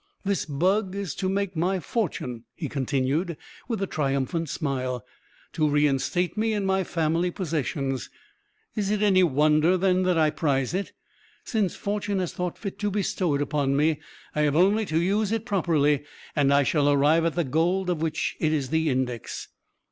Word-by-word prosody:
"This 200 -1 0
bug 185 +7 +1
is 200 -6 -3
to 185 0 -2
make 195 -1 -1
my 180 +4 +1
fortune," 130 - -3
he 160 - -4
continued, 140 +4 -1 0.3
with 225 -5 -2
a - - +2
triumphant 145 +1 -1
smile; 130 -6 -2 0.5
"to 155 -2 +2
reinstate 145 +4 +1
me 220 +1 +1
in 205 -2 -1
my 190 0 +2
family 165 +1 0
possessions. 140 - -2 0.7
Is 205 -2 -1
it 210 0 +1
any 190 -3 +5
wonder, 155 +2 +4
then, 185 0 +2
that 180 -2 +2
I 155 -1 +4
prize 135 -3 0
it? 195 +2 -2 0.5
Since 210 -6 0
Fortune 205 0 -2
has 180 -3 -2
thought 180 -1 -3
fit 200 -3 -6
to 205 - 0
bestow 185 -5 0
it 145 - +1
upon 140 -1 0
me, 150 0 +2 0.3
I 150 - 0
have 150 -1 +2
only 200 +5 +3
to 160 - +1
use 200 +4 +1
it 225 -1 -1
properly, 155 - +2 0.3
and 140 -2 +3
I 140 0 +5
shall 145 +1 +2
arrive 145 +3 +4
at 165 -1 0
the 175 - +1
gold 170 +7 +1
of 165 -3 -2
which 160 -1 -1
it 155 - +1
is 145 -4 -1
the 160 0 +2
index. 125 -3 -3
165 Hz, 180 wpm, -26 LUFS, 145-190 Hz, 0.7 s, any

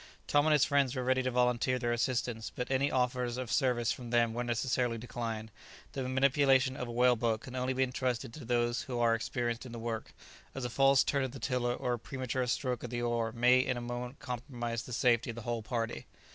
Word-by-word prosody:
Tom 145 +1 +3
and 155 - +5
his 150 - +5
friends 140 -3 +2
were 130 - -2
ready 130 +1 +2
to 130 - 0
volunteer 125 0 +2
their 120 -1 -1
assistance, 120 -2 -1
but 125 +1 -3
any 135 +2 +2
offers 125 -1 0
of 125 -3 -4
service 125 -4 +2
from 120 -2 -6
them 115 -1 +2
were 120 +1 -2
necessarily 120 0 0
declined; 115 -2 -5 0.4
the 130 -2 -3
manipulation 130 0 +3
of 125 - -4
a - - -6
whale 125 +1 +4
boat 115 -1 0
can 130 +1 -9
only 130 0 0
be 130 0 +2
entrusted 125 -1 -2
to 150 - -9
those 120 0 +1
who 125 - -2
are 120 -1 +3
experienced 120 +1 -2
in 125 -3 -9
the - - -6
work, 115 -1 -5 0.4
as 135 -2 -3
a 120 - -3
false 135 +1 +5
turn 140 -2 0
of 130 -1 -3
the 135 - -8
tiller 125 -2 0
or 125 - -1
a 120 - -3
premature 130 +2 -3
stroke 125 0 -1
of 120 - -5
the 120 0 -3
oar 115 -1 0
may 125 +2 +4
in 125 -1 0
a - - -4
moment 120 +2 -5
compromise 120 -2 -4
the 120 - -10
safety 120 -1 +2
of 115 - -4
the 115 - -7
whole 120 0 -2
party. 115 - -3
125 Hz, 230 wpm, -32 LUFS, 120-130 Hz, 0.4 s, and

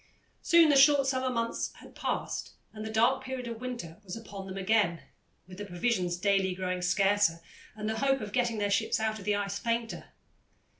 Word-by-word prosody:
Soon 335 -2 +6
the 290 - +5
short 280 0 +6
summer 260 -1 0
months 230 -2 -2
had - - -15
passed - - -3 0.2
and 215 -1 -7
the 220 - -5
dark 235 +4 +2
period 260 -1 -5
of 230 0 -6
winter 235 -10 -6
was 185 -2 -6
upon 200 -4 -8
them 190 0 -6
again, 195 -3 +1 0.4
with 185 +1 -11
the 205 - -4
provisions 180 -2 0
daily 190 -1 +1
growing 185 -1 -2
scarcer, 195 -1 +2 0.4
and 215 0 -5
the 220 0 -2
hope 270 0 +2
of 210 -3 -7
getting 240 -3 +1
their 205 -1 0
ships 220 +2 +1
out 220 0 -1
of 195 - -11
the 210 -1 +2
ice 200 0 -2
fainter. 230 0 -2
215 Hz, 195 wpm, -29 LUFS, 195-240 Hz, 0.4 s, Soon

